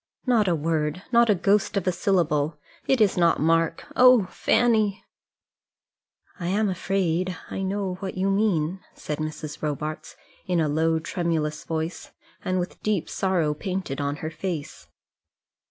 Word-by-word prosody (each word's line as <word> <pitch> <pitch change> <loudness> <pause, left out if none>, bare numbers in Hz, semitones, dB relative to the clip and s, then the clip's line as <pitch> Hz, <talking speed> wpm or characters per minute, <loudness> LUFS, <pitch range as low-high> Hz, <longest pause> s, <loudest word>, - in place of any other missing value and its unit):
"Not 235 -5 +3
a 175 - +3
word, 155 +2 -1
not 235 -1 +5
a 210 - +5
ghost 200 +3 +2
of 195 - -1
a 185 - +3
syllable. 160 -5 +1 0.3
It 265 - +3
is 205 -4 +3
not 170 -2 +3
Mark; 165 +1 +1
oh, 250 -5 +7
Fanny!" 220 -4 +2 1.3
"I 170 - -3
am 205 +3 +1
afraid 185 -1 -1
I - - -3
know 190 -1 -2
what 190 -2 -5
you 195 +1 +1
mean," 190 -4 +1 0.2
said 150 0 -5
Mrs. 155 -1 -5
Robarts 150 +1 -4 0.3
in 180 -2 +1
a 155 - +2
low 160 +2 +1
tremulous 160 -2 -2
voice, 160 +1 -4 0.3
and 185 0 0
with 180 0 -4
deep 210 -6 -1
sorrow 175 -6 +1
painted 180 -3 -4
on 145 0 -1
her 160 - -3
face. 165 -3 -5
180 Hz, 150 wpm, -25 LUFS, 155-195 Hz, 1.3 s, oh